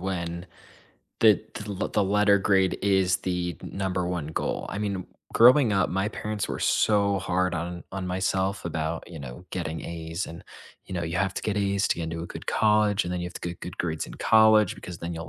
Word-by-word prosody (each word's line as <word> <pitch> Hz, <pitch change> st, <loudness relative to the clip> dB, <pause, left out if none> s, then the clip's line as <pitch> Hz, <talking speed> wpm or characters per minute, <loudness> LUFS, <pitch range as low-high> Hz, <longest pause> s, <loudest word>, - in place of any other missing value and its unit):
when 85 Hz, -1 st, -4 dB, 0.7 s
the 110 Hz, -3 st, +7 dB, 0.2 s
t 105 Hz, -, -6 dB
the 100 Hz, -3 st, -5 dB
l -, -, 0 dB
the 105 Hz, -, +1 dB
letter 100 Hz, +1 st, +4 dB
grade 95 Hz, -1 st, +2 dB
is 95 Hz, -2 st, +3 dB
the 90 Hz, -2 st, -2 dB
number 95 Hz, -2 st, -2 dB
1 85 Hz, -4 st, -3 dB
goal. 80 Hz, -, -2 dB
I 100 Hz, -, -4 dB
mean, 100 Hz, -3 st, -2 dB, 0.3 s
growing 125 Hz, -1 st, +6 dB
up, 95 Hz, -2 st, +2 dB
my 95 Hz, +3 st, 0 dB
parents 105 Hz, -1 st, -3 dB
were -, -, -4 dB
so 100 Hz, -2 st, +2 dB
hard 90 Hz, -1 st, 0 dB
on 85 Hz, +1 st, -4 dB
on 95 Hz, -1 st, -4 dB
myself 95 Hz, +1 st, -1 dB
about, 80 Hz, 0 st, -3 dB
you 85 Hz, -, -8 dB
know, 65 Hz, +5 st, -9 dB
getting 80 Hz, -3 st, -3 dB
A's, 85 Hz, +1 st, -4 dB
and, 85 Hz, -, -10 dB, 0.4 s
you 95 Hz, -, -7 dB
know, 85 Hz, -, -2 dB
"You 85 Hz, +1 st, -3 dB
have 95 Hz, +2 st, 0 dB
to -, -, -4 dB
get 105 Hz, -1 st, -1 dB
A's 100 Hz, 0 st, +1 dB
to -, -, +1 dB
get 85 Hz, -, -3 dB
into 80 Hz, 0 st, -4 dB
a 85 Hz, -, -5 dB
good -, -, -9 dB
college, 105 Hz, -2 st, +3 dB
and 90 Hz, -, -3 dB
then 90 Hz, -, -2 dB
you 85 Hz, -, -3 dB
have 90 Hz, -, -8 dB
to -, -, -3 dB
get 85 Hz, -, -8 dB
good 90 Hz, -, -8 dB
grades 80 Hz, -3 st, -2 dB
in -, -, -10 dB
college 110 Hz, -1 st, +5 dB
because 90 Hz, -2 st, -9 dB
then 85 Hz, 0 st, -5 dB
you'll 80 Hz, 0 st, -6 dB
95 Hz, 225 wpm, -26 LUFS, 85-100 Hz, 0.7 s, the